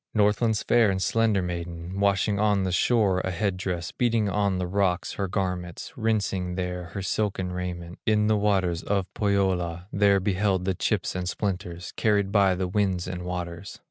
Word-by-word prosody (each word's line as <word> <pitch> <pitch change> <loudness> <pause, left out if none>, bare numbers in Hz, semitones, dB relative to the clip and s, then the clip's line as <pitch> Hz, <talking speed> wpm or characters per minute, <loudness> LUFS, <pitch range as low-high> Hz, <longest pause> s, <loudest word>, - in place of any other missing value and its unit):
Northland's 105 +1 +2
fair 115 -3 +4
and 95 -1 0
slender 105 +1 +2
maiden, 85 +1 -5
Washing 100 +1 +2
on 105 -2 +2
the 95 - -1
shore 100 0 +3
a 95 - -2
head 95 +2 -1
dress, 90 -2 -3
Beating 115 -3 +1
on 100 -1 +1
the 90 - -1
rocks 90 -1 0
her 100 - -2
garments, 90 - -3
Rinsing 100 -6 -1
there 90 -1 -3
her 100 - -3
silken 95 -1 -1
raiment, 90 -1 -5
In 105 -1 +3
the 110 0 +3
waters 95 -5 +1
of 100 -2 0
Pohyola, 95 -4 0
There 100 0 +4
beheld 95 -1 0
the 95 - +1
chips - - -1
and 90 -1 -2
splinters, 90 -4 -3
Carried 100 -3 +2
by 100 -3 +4
the 90 0 -1
winds 95 -2 0
and 90 -1 -4
waters. 90 +1 -5
95 Hz, 175 wpm, -26 LUFS, 90-105 Hz, -, fair